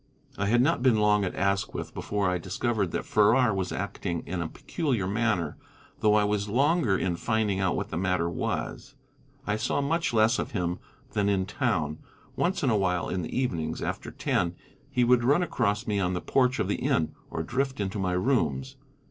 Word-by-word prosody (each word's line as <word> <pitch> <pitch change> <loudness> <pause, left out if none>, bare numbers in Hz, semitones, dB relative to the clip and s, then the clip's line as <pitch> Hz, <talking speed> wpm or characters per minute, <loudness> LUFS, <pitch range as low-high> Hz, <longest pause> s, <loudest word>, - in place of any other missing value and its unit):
I 100 - -1
had 120 +3 +4
not 135 - +2
been 125 -3 +4
long 105 -1 +3
at 90 - -4
Asquith 100 +1 -1
before 100 -1 -1
I 90 -1 0
discovered 105 +2 -1
that - - -3
Farrar 110 +2 +4
was 95 -2 -2
acting 90 -3 -3
in 90 0 -3
a 85 - -2
peculiar 130 - -2
manner, 105 -4 0 0.4
though 105 -1 +4
I 105 - +4
was 105 0 0
longer 135 - +2
in 90 -2 -1
finding 105 -1 0
out 95 -2 +1
what - - -3
the 80 - -3
matter 90 -2 +1
was. 85 - -3 0.5
I 105 0 0
saw 110 - 0
much 165 +4 0
less 110 0 +3
of - - -4
him 90 -3 -1 0.3
than 105 -2 +1
in 95 -2 +1
town. 90 - -1 0.4
Once 180 -1 0
in 130 - +3
a 110 - +3
while 90 -3 0
in 90 - -1
the 80 - -4
evenings, 80 -11 -1
after - - -4
ten, 85 -1 -1 0.3
he 125 - +1
would 120 0 +4
run 145 +8 +4
across 105 -11 0
me 105 -2 0
on 90 -1 0
the - - -1
porch 130 -1 +2
of - - 0
the - - 0
inn, 80 - 0 0.2
or 80 - -3
drift 130 +6 -2
into 100 +1 -2
my 95 -2 0
rooms. 90 - 0
105 Hz, 200 wpm, -27 LUFS, 90-120 Hz, 0.5 s, had